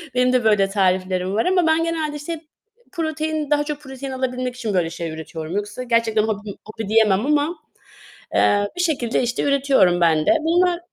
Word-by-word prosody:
benim 250 Hz, 0 st, +3 dB
de 250 Hz, -2 st, +2 dB
böyle 205 Hz, -3 st, +3 dB
tariflerim 185 Hz, -1 st, 0 dB
var 225 Hz, -, +1 dB
ama 360 Hz, -2 st, +2 dB
ben 320 Hz, +1 st, +3 dB
genelde, 320 Hz, -3 st, -2 dB
işte, 310 Hz, +2 st, -6 dB, 0.5 s
protein, 315 Hz, -3 st, -2 dB
daha 295 Hz, 0 st, +3 dB
çok 295 Hz, -1 st, -5 dB
protein 265 Hz, -1 st, -7 dB
alabilmek 255 Hz, -1 st, -3 dB
için, 230 Hz, -4 st, -3 dB
böyle, 175 Hz, -3 st, +1 dB
şey 170 Hz, 0 st, -5 dB
üretiyorum. 160 Hz, +1 st, -7 dB
Yoksa 205 Hz, +4 st, -4 dB
gerçekten 230 Hz, -3 st, +1 dB
hobim, 210 Hz, -2 st, -4 dB
hobi 215 Hz, -1 st, -7 dB
diyemem 215 Hz, -1 st, +3 dB
ama, 300 Hz, +3 st, +1 dB, 0.8 s
eee, 205 Hz, 0 st, +3 dB
bir -, -, 0 dB
şekilde, 270 Hz, -9 st, 0 dB
işte, 240 Hz, 0 st, -1 dB
üretiyorum 270 Hz, -11 st, +3 dB
ben 160 Hz, -2 st, +3 dB
de. -, -, +4 dB
Bunlar 345 Hz, +2 st, +2 dB
245 Hz, 175 wpm, -21 LUFS, 200-300 Hz, 0.8 s, de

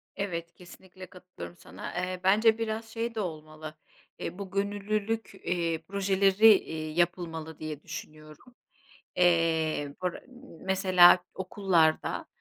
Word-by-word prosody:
Evet, 170 Hz, -4 st, -4 dB
kesinlikle 185 Hz, +1 st, -13 dB
katılıyorum 180 Hz, -1 st, -11 dB
sana. -, -, -9 dB
Eee, 180 Hz, +1 st, -3 dB
bence 220 Hz, +4 st, +4 dB
biraz 225 Hz, 0 st, -3 dB
şey 230 Hz, +1 st, -4 dB
de -, -, -2 dB
olmalı. 155 Hz, -4 st, -6 dB, 0.4 s
Eee, 180 Hz, -, -5 dB
bu 195 Hz, -1 st, -7 dB
gönüllülük, 205 Hz, +2 st, -2 dB
eee, 170 Hz, -2 st, -1 dB
projeleri, 195 Hz, +2 st, +5 dB
iii, 160 Hz, -3 st, -3 dB
yapılmalı 165 Hz, -2 st, -2 dB
diye 155 Hz, -1 st, -6 dB
düşünüyorum. 155 Hz, -, -10 dB, 0.6 s
Eee, 160 Hz, -4 st, +2 dB
bur 180 Hz, -1 st, 0 dB, 0.5 s
mesela 185 Hz, -2 st, +5 dB
okullarda, 185 Hz, -4 st, +1 dB
180 Hz, 110 wpm, -28 LUFS, 160-200 Hz, 0.6 s, projeleri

